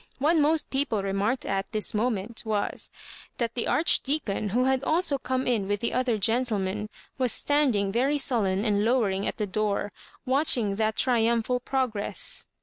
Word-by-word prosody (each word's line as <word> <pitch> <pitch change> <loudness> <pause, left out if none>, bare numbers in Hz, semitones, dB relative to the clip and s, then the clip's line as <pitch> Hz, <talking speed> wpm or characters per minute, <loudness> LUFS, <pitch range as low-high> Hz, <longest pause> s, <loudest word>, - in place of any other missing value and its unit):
What 300 +5 +2
most 310 0 +2
people 265 -7 -1
remarked 200 +6 -1
at 195 0 -2
this 215 -1 0
moment 225 0 -1
was, 215 -2 -2 0.5
that 235 -1 -2
the 240 - -2
Archdeacon, 275 -9 +1
who 245 +6 +1
had 265 0 +1
also 310 -2 +1
come 260 0 -2
in 225 -6 0
with 205 +1 -1
tlie 235 - -1
other 250 -3 +1
gentlemen, 210 -2 -1 0.3
was 255 -3 +2
standing 255 -10 +1
very 265 +7 +1
sullen 210 -7 +1
and 205 -2 +1
lowering 210 -5 +1
at - - -3
the 215 - -1
door, 205 0 -1 0.3
watching 255 -7 +2
that 220 0 0
triumphal 235 0 +1
progress. 250 -5 0
230 Hz, 155 wpm, -26 LUFS, 205-260 Hz, 0.5 s, What